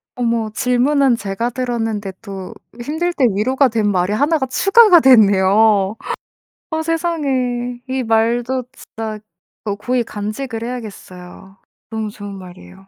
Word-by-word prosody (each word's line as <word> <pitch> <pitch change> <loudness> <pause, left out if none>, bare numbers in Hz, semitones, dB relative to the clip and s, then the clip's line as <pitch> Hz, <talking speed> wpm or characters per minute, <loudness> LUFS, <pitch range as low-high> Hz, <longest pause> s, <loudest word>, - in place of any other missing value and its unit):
어머 230 -3 -1
질문은 255 +2 +2
제가 205 +3 -3
들었는데 225 -5 -3
또 195 -2 -8 0.3
힘들 320 +7 -2
때 280 -6 +2
위로가 260 +7 +2
된 220 -2 0
말이 185 +1 0
1가 285 +4 +1
추가가 390 - +5
됐네요. 205 -4 +4 0.8
어 320 0 -1
세상에. 265 -8 -1
이 260 0 -1
말도 235 +3 +1
진짜 220 -4 -7 0.5
어 205 -2 -1
고이 245 +4 -1
간직을 225 +3 -5
해야겠어요. 195 -5 -9 0.3
너무 220 -2 -3
좋은 205 -1 -9
말이에요. 190 +1 -13
230 Hz, 260 characters per minute, -18 LUFS, 205-260 Hz, 0.8 s, 추가가